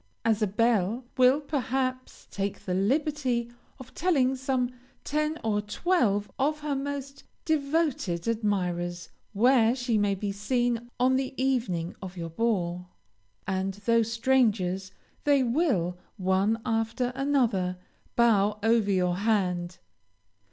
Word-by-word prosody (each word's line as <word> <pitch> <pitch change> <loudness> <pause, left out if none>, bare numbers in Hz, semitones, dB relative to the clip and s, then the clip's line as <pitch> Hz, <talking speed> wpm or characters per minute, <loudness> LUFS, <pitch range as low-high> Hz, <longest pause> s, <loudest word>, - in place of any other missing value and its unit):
as 225 -1 +2
a 215 - +3
belle, 225 +2 +1
will, 255 +2 +5
perhaps, 260 -3 -3
take 200 0 -3
the 185 - -3
liberty 250 +3 0 0.3
of 260 -2 -12
telling 275 -7 +2
some 260 -1 -1 0.3
ten 305 +2 -1
or 210 -2 +1
twelve 210 - +1
of 300 +3 0
her 295 -1 -2
most 275 0 -5 0.2
devoted 280 - 0
admirers 180 -6 -1 0.2
where 235 +2 +4
she 245 -4 0
may 205 -1 +1
be 200 +1 -3
seen 240 +3 -1
on 260 +1 +3
the 265 0 -3
evening 235 -11 0
of 190 -1 -8
your 165 -1 -5
ball, 180 -3 -1 0.6
and, 190 0 -2
though 230 0 +4
strangers, 220 -5 +1 0.3
they 285 -2 +4
will, 230 - 0 0.2
one 195 +3 +1
after 225 +2 0
another, 240 -10 +1 0.4
bow 210 -3 +3
over 225 -2 +3
your 180 -2 +1
hand. 185 -4 0
230 Hz, 125 wpm, -27 LUFS, 195-265 Hz, 0.6 s, will